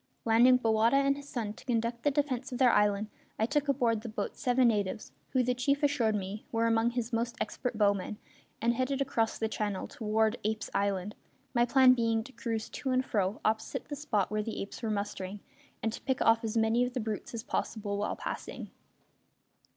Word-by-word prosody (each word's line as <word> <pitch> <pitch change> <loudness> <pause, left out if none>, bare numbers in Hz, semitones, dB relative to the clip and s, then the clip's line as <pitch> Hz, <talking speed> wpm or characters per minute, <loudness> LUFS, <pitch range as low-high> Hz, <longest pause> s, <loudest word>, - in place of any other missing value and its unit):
Landing 240 +3 +6
Bowata 225 +1 +3
and 275 0 +3
his 285 0 -10
son 220 -4 -3
to - - -15
conduct 235 -1 -1
the 290 - +3
defence 280 -2 -1
of 250 - -3
their 250 -2 +5
island, 210 0 +2 0.3
I 220 - +2
took 290 +4 0
aboard 240 -5 +2
the 230 - -6
boat 215 - -4
seven 250 -1 +3
natives, 210 0 -2 0.2
who, 255 -2 +2
the 250 +1 +1
chief 280 +4 0
assured 250 -7 +2
me, 200 +1 -4
were 230 0 +1
among 225 0 +3
his 240 0 -3
most 230 +1 -1
expert 250 -3 -3
bowmen, 205 -1 +1 0.4
and 235 +1 +2
headed 260 +3 -1
across 240 -5 0
the 225 - 0
channel 210 -3 -3
toward 220 0 0
Apes' 220 +1 -2
Island, 200 0 0 0.4
my 240 -1 +4
plan 255 +1 +6
being 230 -2 +1
to 265 - -12
cruise 225 -2 -3
to 270 - -4
and 255 0 +2
fro 200 -3 -1
opposite 220 +5 -1
the 290 - -3
spot 235 -10 -1
where 215 0 0
the 220 +1 -4
apes 200 - -9
were 225 - -2
mustering, 200 -1 -3 0.4
and 225 - 0
to - - -7
pick 265 -1 -1
off 225 0 +4
as 225 +1 -2
many 225 +2 +3
of 250 0 -2
the 255 - -1
brutes 220 +1 -4
as 225 - -4
possible 205 -4 -2
while 210 - -1
passing. - - -6
230 Hz, 205 wpm, -30 LUFS, 215-250 Hz, 0.4 s, Landing